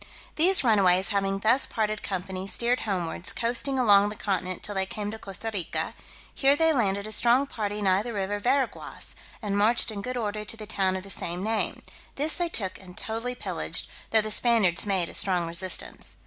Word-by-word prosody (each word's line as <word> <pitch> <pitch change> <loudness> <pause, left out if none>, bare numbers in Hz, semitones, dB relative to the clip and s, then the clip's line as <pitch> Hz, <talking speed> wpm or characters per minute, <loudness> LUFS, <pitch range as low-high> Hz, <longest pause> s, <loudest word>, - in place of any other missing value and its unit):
These 365 +3 +6
runaways 195 -5 +3
having 195 -1 0
thus 230 +7 +3
parted 215 -1 -2
company, 190 0 -5
steered 240 +4 +1
homewards, 180 -4 -2
coasting 245 +3 0
along 205 -5 +5
the 210 - -7
continent 185 -3 -3
till 205 - -3
they 190 -1 -1
came 205 +1 -4
to 220 - -8
Costa 200 +3 -6
Rica; 185 -5 -2 0.4
here 275 0 +3
they 325 +1 +3
landed 200 -6 0
a 215 - -6
strong 240 +5 +3
party 210 -5 -4
nigh 190 0 +3
the 235 +2 -5
river 205 -1 -2
Veraguas, 255 +3 -2 0.3
and 200 -1 -2
marched 220 +3 +4
in 205 -2 -6
good 250 +3 -4
order 210 -2 -3
to 220 +2 -3
the 215 - -8
town 195 -3 0
of 190 - -5
the 195 - -7
same 175 +1 -3
name: 220 +1 -1 0.3
this 300 +3 +3
they 350 -1 0
took 195 - -1
and 180 -2 -14
totally 230 +3 -3
pillaged, - - -1 0.2
though 220 - +4
the 215 0 -4
Spaniards 210 -6 +2
made 190 -4 +1
a - - -10
strong 180 -3 +2
resistance. 170 +2 -1
210 Hz, 195 wpm, -26 LUFS, 190-235 Hz, 0.4 s, These